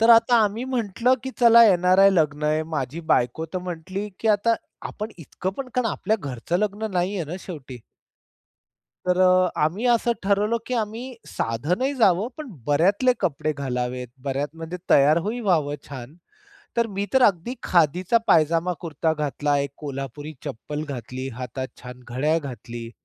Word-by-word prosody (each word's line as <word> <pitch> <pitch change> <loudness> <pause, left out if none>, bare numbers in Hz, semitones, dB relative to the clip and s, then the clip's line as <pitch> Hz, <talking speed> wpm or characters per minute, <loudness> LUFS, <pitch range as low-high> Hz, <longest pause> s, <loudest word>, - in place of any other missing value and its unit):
तर 225 +1 +6
आता 230 +1 +6
आम्ही 215 +4 -2
म्हंटलं 235 +2 +2
की 265 - -3
चला 235 -1 +8
एन-आर-आय 185 +2 +5
लग्न 150 -4 +1
आहे, 155 +1 +1
माझी 145 +3 -3
बायको 160 +7 +1
तर 185 - +1
म्हटली, 190 +5 -5
"की 225 - 0
आता 230 +3 +2 0.4
आपण 215 +1 -5
इतकं 175 +4 -4
पण 265 -2 -4
कारण 250 -2 +1
आपल्या 220 +2 0
घरचं 140 +5 -2
लग्न 210 +1 -2
नाहीये 180 -1 -1
ना - - -3
शेवटी." 135 -7 -8 1.3
तर 180 0 +2
अ, 185 0 +5 0.2
आम्ही 185 +10 -2
असं 235 0 +3
ठरवलं 205 +3 +2
की 255 - -2
आम्ही 230 +3 -3
साधनही 180 - -1
जावं, 210 -3 +3
पण 310 -2 -7 0.2
बऱ्यातले 195 - +3
कपडे 155 -1 0
घालावेत. 125 -3 -3 0.2
बऱ्यात 140 +2 -1
म्हणजे 165 +2 -6
तयार 145 +3 +6
होई 235 +3 -2
व्हावं 160 -9 +1
छान. 135 +2 -9 0.6
तर 235 -1 +3
मी 200 -1 -3
तर 265 -1 +4
अगदी 200 +3 +2
खादीचा 180 +6 +3
पायजामा 165 +3 +3
कुर्ता 160 -1 -1
घातला, 145 -1 0
एक 140 -1 -2
कोल्हापुरी 145 +1 -6
चप्पल 150 +6 -5
घातली, 130 0 -5
हातात 130 +1 -4 0.2
छान 125 0 -9
घड्याळ 145 +7 +1
घातली. 120 -5 -7
170 Hz, 155 wpm, -24 LUFS, 145-210 Hz, 1.3 s, चला